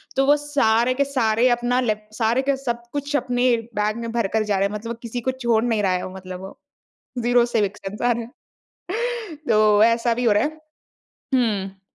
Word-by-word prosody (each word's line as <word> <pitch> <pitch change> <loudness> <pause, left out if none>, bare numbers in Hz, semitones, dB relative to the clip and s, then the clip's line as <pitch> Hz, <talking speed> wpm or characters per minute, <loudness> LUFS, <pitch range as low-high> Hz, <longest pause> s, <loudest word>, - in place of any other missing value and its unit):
तो 270 - +3
वो 290 +2 +6
सारे 255 -5 +2
के 280 - +1
सारे 245 -3 +2
अपना 240 +1 +1
लेप 215 -3 -2
सारे 230 +2 +2
के 275 0 +1
सब 240 -3 -3
कुछ 285 0 -2
अपने 250 -2 +2 0.2
बैग 210 +2 0
में 230 -1 -4
भर 230 -3 0
कर 220 -1 +2
जा 205 -2 0
रहे 195 +1 +2
हैं। 205 - -8
मतलब 220 +2 -6
वो 235 - -6
किसी 240 +1 -5
को 260 - 0
छोड़ 235 -4 +1
नहीं 225 -4 0
रहा 190 - +2
है 180 0 -1
वो 185 - -10
मतलब 185 -1 -8
वो 190 - -10 0.6
ज़ीरो 240 0 +4
सिविक 205 -4 -1
सेंस 195 +2 -7
आ 245 0 +3
रहा 235 0 -1 0.5
है, 450 -3 -5
तो 215 -1 +5
ऐसा 230 0 +2
भी 245 +1 -2
हो 220 - +4
रहा 205 - +3
है। 315 +1 -4 0.7
हुँ। 195 -6 0
235 Hz, 215 wpm, -22 LUFS, 215-255 Hz, 0.7 s, वो